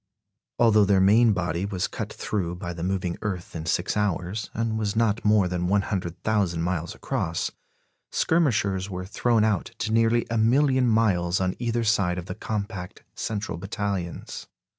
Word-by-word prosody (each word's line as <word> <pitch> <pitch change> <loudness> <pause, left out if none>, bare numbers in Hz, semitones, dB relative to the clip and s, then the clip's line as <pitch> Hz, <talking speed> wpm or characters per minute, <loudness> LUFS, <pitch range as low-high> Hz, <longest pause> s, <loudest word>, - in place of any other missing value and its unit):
Although 110 -3 +5
their 100 -1 +4
main 110 +5 +5
body 85 -3 -1
was 100 -3 -1
cut - - -5
through 90 -5 -3
by 90 0 -5
the 85 - -7
moving 90 -1 -2
earth 95 -6 -4
in 80 0 -5
six 85 +1 0
hours, 105 0 -1
and 110 -1 -1
was 105 -1 -1
not 115 -1 +1
more 105 -3 +4
than 90 0 -1
100,000 95 -1 0
miles 85 -2 -2
across, 80 0 -2 0.6
skirmishers 105 - +1
were 90 -1 -5
thrown 115 +3 +1
out 110 -4 +1
to 115 -1 -2
nearly 115 +1 +3
a 115 - +1
million 130 +3 +3
miles 95 -6 +2
on 95 -1 0
either 120 -1 0
side 100 -5 +2
of 90 - -5
the - - -5
compact 100 -4 -5
central 105 -6 -4
battalions. 95 -2 -4
100 Hz, 160 wpm, -25 LUFS, 90-110 Hz, 0.6 s, Although